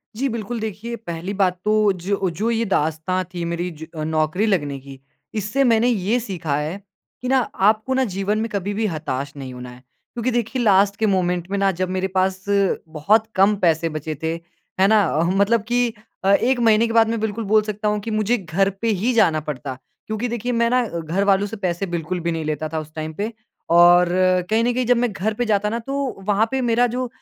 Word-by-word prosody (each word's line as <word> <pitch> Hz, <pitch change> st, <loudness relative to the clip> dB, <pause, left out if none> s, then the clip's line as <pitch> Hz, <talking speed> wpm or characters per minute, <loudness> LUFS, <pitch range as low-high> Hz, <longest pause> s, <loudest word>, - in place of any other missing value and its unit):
जी, 265 Hz, +5 st, 0 dB
बिल्कुल। 230 Hz, 0 st, -4 dB
देखिए, 220 Hz, +2 st, -5 dB
पहली 180 Hz, -3 st, -6 dB
बात 185 Hz, -2 st, +1 dB
तो 215 Hz, -1 st, +3 dB
जो 195 Hz, -1 st, 0 dB
जो 205 Hz, +7 st, -2 dB
ये 230 Hz, 0 st, 0 dB
दास्ताँ 170 Hz, 0 st, 0 dB
थी 175 Hz, -1 st, -4 dB
मेरी 170 Hz, +1 st, -2 dB
ज 160 Hz, -, -8 dB, 0.2 s
नौकरी 155 Hz, +6 st, +1 dB
लगने 145 Hz, -10 st, 0 dB
की, 135 Hz, 0 st, -12 dB, 0.3 s
इससे 215 Hz, +6 st, 0 dB
मैंने 235 Hz, -2 st, +3 dB
ये 225 Hz, 0 st, +1 dB
सीखा 180 Hz, -10 st, -3 dB
है 155 Hz, +5 st, -3 dB, 0.4 s
कि 250 Hz, -, -4 dB
ना 265 Hz, +1 st, +4 dB, 0.3 s
आपको 220 Hz, +4 st, -4 dB
ना 265 Hz, 0 st, +2 dB
जीवन 195 Hz, +2 st, 0 dB
में 225 Hz, +1 st, -2 dB
कभी 200 Hz, -1 st, -3 dB
भी 220 Hz, +2 st, -1 dB
हताश 145 Hz, -5 st, -4 dB
नहीं 130 Hz, -2 st, -7 dB
होना 125 Hz, 0 st, -8 dB
है। 125 Hz, +1 st, -14 dB, 0.3 s
क्योंकि 240 Hz, +1 st, -1 dB
देखिए 240 Hz, +2 st, -1 dB
लास्ट 200 Hz, -2 st, +4 dB
के 220 Hz, -, +2 dB
मोमेंट 180 Hz, -3 st, 0 dB
में 200 Hz, -, 0 dB
ना 195 Hz, 0 st, +3 dB
जब 185 Hz, -1 st, 0 dB
मेरे 185 Hz, +1 st, -1 dB
पास 190 Hz, 0 st, +1 dB, 0.4 s
बहुत 195 Hz, +8 st, +2 dB
कम 200 Hz, +2 st, +4 dB
पैसे 165 Hz, -1 st, +2 dB
बचे 155 Hz, 0 st, -4 dB
थे, 160 Hz, 0 st, 0 dB, 0.5 s
है 190 Hz, -, +5 dB
ना, 215 Hz, 0 st, +5 dB
अह, 165 Hz, +1 st, +1 dB
मतलब 205 Hz, +3 st, +3 dB
कि 240 Hz, -1 st, +1 dB, 0.3 s
अ, 195 Hz, -, +2 dB
1 245 Hz, +5 st, +2 dB
महीने 225 Hz, -1 st, +4 dB
के 225 Hz, -, -3 dB
बाद 225 Hz, -1 st, +5 dB
मैं 230 Hz, 0 st, -1 dB
बिल्कुल 220 Hz, +1 st, -2 dB
बोल 215 Hz, +2 st, +4 dB
सकता 210 Hz, 0 st, -3 dB
हूँ 210 Hz, 0 st, +1 dB
कि 225 Hz, -, -5 dB
मुझे 215 Hz, +2 st, +1 dB
घर 195 Hz, 0 st, 0 dB
पे 230 Hz, -, 0 dB
ही 240 Hz, +4 st, +2 dB
जाना 180 Hz, -9 st, +3 dB
पड़ता, 140 Hz, -3 st, -5 dB, 0.3 s
क्योंकि 220 Hz, +3 st, -2 dB
देखिए 240 Hz, +1 st, -3 dB
मैं 235 Hz, -1 st, +2 dB
ना 250 Hz, +1 st, +3 dB
अ, 170 Hz, -7 st, -4 dB
घर 165 Hz, +5 st, -1 dB
वालों 200 Hz, 0 st, +3 dB
से 215 Hz, -, -7 dB
पैसे 185 Hz, -1 st, -2 dB
बिल्कुल 175 Hz, +1 st, -3 dB
भी 170 Hz, 0 st, -2 dB
नहीं 165 Hz, -1 st, -3 dB
लेता 155 Hz, 0 st, -2 dB
था 160 Hz, 0 st, -2 dB
उस 155 Hz, 0 st, -10 dB
टाइम 155 Hz, 0 st, -4 dB
पे। 210 Hz, +7 st, -3 dB, 0.4 s
और 175 Hz, +1 st, +6 dB, 0.4 s
कहीं 220 Hz, +1 st, +2 dB
न 245 Hz, +1 st, +1 dB
कहीं 250 Hz, +1 st, 0 dB
जब 245 Hz, +1 st, +3 dB
मैं 240 Hz, -1 st, +1 dB
घर 205 Hz, +3 st, -1 dB
पे 245 Hz, +3 st, -2 dB
जाता 210 Hz, -2 st, +1 dB
ना, 230 Hz, +2 st, -2 dB
तो 270 Hz, -4 st, -4 dB
वहाँ 210 Hz, +1 st, +3 dB
पे 265 Hz, 0 st, 0 dB
मेरा 240 Hz, 0 st, +3 dB
जो 250 Hz, +2 st, -3 dB
200 Hz, 225 wpm, -21 LUFS, 170-225 Hz, 0.5 s, और